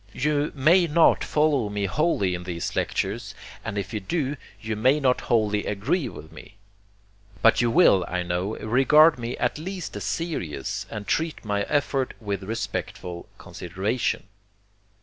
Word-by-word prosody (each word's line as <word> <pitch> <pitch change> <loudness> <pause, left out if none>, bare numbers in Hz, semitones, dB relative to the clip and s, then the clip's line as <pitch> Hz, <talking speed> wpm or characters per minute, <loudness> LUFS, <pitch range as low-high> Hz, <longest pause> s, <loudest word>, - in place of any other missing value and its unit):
You 150 +1 0
may 170 +6 +4
not 165 +2 +4
follow 150 -7 +1
me 100 -1 -2
wholly 100 - +1
in 90 0 -4
these 85 -2 -4
lectures; - - -2 0.3
and 100 - -4
if 100 0 -4
you 110 - -1
do, 140 - -2 0.2
you 110 -1 -3
may 130 +7 +3
not 130 -3 +2
wholly 105 -3 +1
agree 130 - -1
with 80 - -11
me. 105 - -13 0.9
But 115 +1 +5
you 120 - +2
will, 115 - +5
I 90 0 -2
know, 90 +4 -2
regard 135 +6 +5
me 120 +1 -4
at - - -1
least 185 +2 -6
as - - -5
serious, 90 - -3
and 105 -1 -6
treat 160 +2 -1
my 100 -1 0
effort 135 -2 0
with 100 -4 -3
respectful 95 -4 -5
consideration. 95 +8 -2
115 Hz, 150 wpm, -25 LUFS, 100-150 Hz, 0.9 s, But